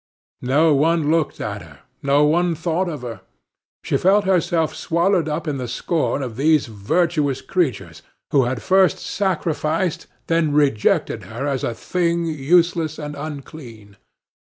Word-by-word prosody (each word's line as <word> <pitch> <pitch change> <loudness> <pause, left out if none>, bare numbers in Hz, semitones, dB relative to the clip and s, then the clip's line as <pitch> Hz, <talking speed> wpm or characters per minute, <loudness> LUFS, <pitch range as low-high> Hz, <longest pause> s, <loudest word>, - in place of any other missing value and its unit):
No 150 +5 +3
one 155 +1 +2
looked 160 -2 0
at - - -4
her, - - -15 0.2
no 140 +1 +3
one 170 +3 +2
thought 175 +3 -1
of 150 -6 -6
her. 115 -5 -7 0.6
She - - 0
felt 200 +2 +3
herself 170 -3 +1
swallowed 170 -1 +1
up 155 +2 -3
in 145 -2 -1
the 125 -2 -4
scorn 145 +3 -1
of 120 -3 -6
these 155 +2 +3
virtuous 140 - -1
creatures, 105 - -2 0.3
who 135 -3 +4
had 120 -3 -3
first 190 +6 +3
sacrificed, 170 -3 -2 0.2
then 165 -3 +1
rejected 140 -8 +1
her 120 +5 -5
as 135 -3 -2
a 115 - -2
thing 170 +2 -1
useless 165 +1 +1
and 150 -1 -6
unclean. 140 -8 -9
155 Hz, 145 wpm, -21 LUFS, 135-170 Hz, 0.6 s, who